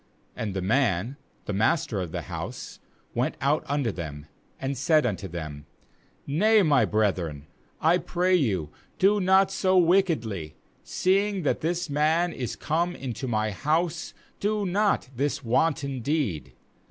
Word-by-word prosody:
23And 105 Hz, -3 st, -3 dB
the 95 Hz, -, -1 dB
man, 115 Hz, +1 st, +1 dB, 0.3 s
the 105 Hz, -, -3 dB
master 110 Hz, -, +1 dB
of 85 Hz, -3 st, -5 dB
the -, -, -4 dB
house, -, -, -7 dB, 0.3 s
went -, -, -1 dB
out 140 Hz, +4 st, +1 dB
unto 140 Hz, -5 st, 0 dB
them, 75 Hz, -5 st, -7 dB, 0.3 s
and 135 Hz, +1 st, -2 dB
said 155 Hz, +3 st, +3 dB
unto 100 Hz, -4 st, -2 dB
them: 75 Hz, -4 st, -7 dB, 0.6 s
'Nay, 210 Hz, +9 st, +4 dB
my 145 Hz, -6 st, +4 dB
brethren, 90 Hz, -9 st, -1 dB, 0.3 s
I 170 Hz, +3 st, +3 dB
pray 180 Hz, +1 st, 0 dB
you, 100 Hz, -, +1 dB, 0.3 s
do 205 Hz, +2 st, +4 dB
not 190 Hz, +1 st, +4 dB
so 190 Hz, -1 st, +2 dB
wickedly; 160 Hz, -, +2 dB, 0.3 s
seeing 195 Hz, 0 st, +1 dB
that 145 Hz, -, 0 dB
this 175 Hz, +2 st, -1 dB
man 160 Hz, +4 st, +1 dB
is 125 Hz, -4 st, -4 dB
come 170 Hz, +3 st, -1 dB
into 130 Hz, -1 st, -5 dB
my 110 Hz, -2 st, 0 dB
house, 160 Hz, -, -1 dB, 0.2 s
do 210 Hz, 0 st, 0 dB
not 200 Hz, -3 st, +1 dB
this 140 Hz, +3 st, -1 dB
wanton 140 Hz, +2 st, 0 dB
deed. 125 Hz, -, -2 dB
140 Hz, 140 wpm, -26 LUFS, 105-175 Hz, 0.6 s, Nay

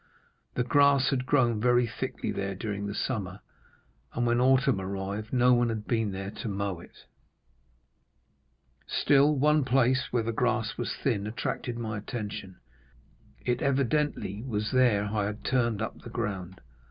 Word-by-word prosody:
"The 125 Hz, -, +1 dB
grass 140 Hz, +2 st, +4 dB
had 130 Hz, -2 st, -1 dB
grown 120 Hz, -6 st, +2 dB
very 120 Hz, 0 st, +4 dB
thickly 115 Hz, -, -4 dB
there 100 Hz, 0 st, -3 dB
during 100 Hz, 0 st, -4 dB
the 100 Hz, -, -4 dB
summer, 100 Hz, -6 st, -3 dB, 0.7 s
and 120 Hz, -, 0 dB
when 120 Hz, +1 st, +2 dB
autumn 130 Hz, -3 st, +3 dB
arrived 100 Hz, +3 st, -4 dB
no 125 Hz, 0 st, +4 dB
one 120 Hz, -1 st, +3 dB
had 110 Hz, -2 st, -3 dB
been 110 Hz, -4 st, 0 dB
there 95 Hz, +1 st, -5 dB
to 110 Hz, -, -6 dB
mow 100 Hz, -3 st, -2 dB
it. -, -, -16 dB, 1.8 s
Still 145 Hz, +1 st, +4 dB
one 150 Hz, +2 st, +3 dB
place 130 Hz, 0 st, +2 dB
where 120 Hz, -2 st, 0 dB
the 115 Hz, -, -1 dB
grass 115 Hz, -1 st, 0 dB
was -, -, -3 dB
thin 105 Hz, -6 st, -1 dB
attracted 120 Hz, +2 st, -3 dB
my 110 Hz, -2 st, -3 dB
attention; 105 Hz, -4 st, -6 dB, 0.9 s
it 125 Hz, +3 st, 0 dB
evidently 140 Hz, -, 0 dB
was 105 Hz, -4 st, -2 dB
there 120 Hz, -6 st, +3 dB
I 105 Hz, 0 st, -1 dB
had 105 Hz, +1 st, -5 dB
turned 120 Hz, -5 st, +1 dB
up -, -, -6 dB
the -, -, -9 dB
ground. 95 Hz, -6 st, -4 dB
115 Hz, 155 wpm, -28 LUFS, 100-130 Hz, 1.8 s, grass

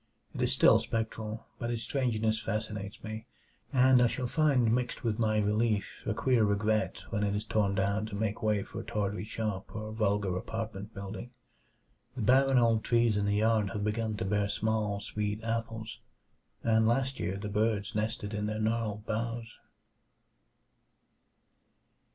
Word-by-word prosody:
It -, -, -4 dB
is -, -, +2 dB
still -, -, +6 dB
spectral, 110 Hz, -1 st, -3 dB
but 120 Hz, -, -2 dB
its 115 Hz, -1 st, -1 dB
strangeness 110 Hz, -5 st, 0 dB
fascinates 105 Hz, -2 st, -4 dB
me, 110 Hz, +2 st, -6 dB, 0.4 s
and 130 Hz, -2 st, +6 dB
I 120 Hz, -, +6 dB
shall 125 Hz, +2 st, -2 dB
find 125 Hz, -4 st, +3 dB
mixed 125 Hz, 0 st, -1 dB
with 110 Hz, -2 st, 0 dB
my 110 Hz, -2 st, +2 dB
relief 105 Hz, 0 st, 0 dB
a -, -, 0 dB
queer 125 Hz, -4 st, +3 dB
regret 105 Hz, +1 st, +1 dB
when 105 Hz, -2 st, 0 dB
it 100 Hz, 0 st, +1 dB
is 105 Hz, +1 st, -2 dB
torn 105 Hz, -3 st, +1 dB
down 100 Hz, +2 st, 0 dB
to 105 Hz, -, -6 dB
make 110 Hz, 0 st, -2 dB
way 105 Hz, -2 st, +1 dB
for 115 Hz, -, -8 dB
a -, -, -5 dB
tawdry 105 Hz, -2 st, -2 dB
shop 105 Hz, -2 st, -4 dB
or 110 Hz, 0 st, -5 dB
vulgar 100 Hz, -3 st, +1 dB
apartment 110 Hz, +1 st, -5 dB
building. 100 Hz, +4 st, -6 dB, 0.9 s
The 125 Hz, -, -3 dB
barren 135 Hz, +3 st, +5 dB
old 115 Hz, -2 st, +4 dB
trees 115 Hz, -2 st, +3 dB
in 100 Hz, 0 st, +1 dB
the 100 Hz, 0 st, +2 dB
yard 110 Hz, -1 st, +2 dB
have 105 Hz, -, -2 dB
begun 110 Hz, 0 st, -1 dB
to -, -, -2 dB
bear 100 Hz, +1 st, +1 dB
small, 105 Hz, -1 st, 0 dB
sweet 105 Hz, +1 st, -3 dB
apples, 115 Hz, -1 st, -3 dB, 0.6 s
and 110 Hz, -1 st, +4 dB
last 130 Hz, +3 st, +1 dB
year 95 Hz, +2 st, -2 dB
the 105 Hz, +1 st, -5 dB
birds 105 Hz, 0 st, 0 dB
nested 110 Hz, 0 st, -2 dB
in 105 Hz, 0 st, -1 dB
their 110 Hz, 0 st, -2 dB
gnarled 110 Hz, -1 st, -1 dB
boughs. 115 Hz, +1 st, -3 dB
110 Hz, 165 wpm, -30 LUFS, 105-115 Hz, 0.9 s, still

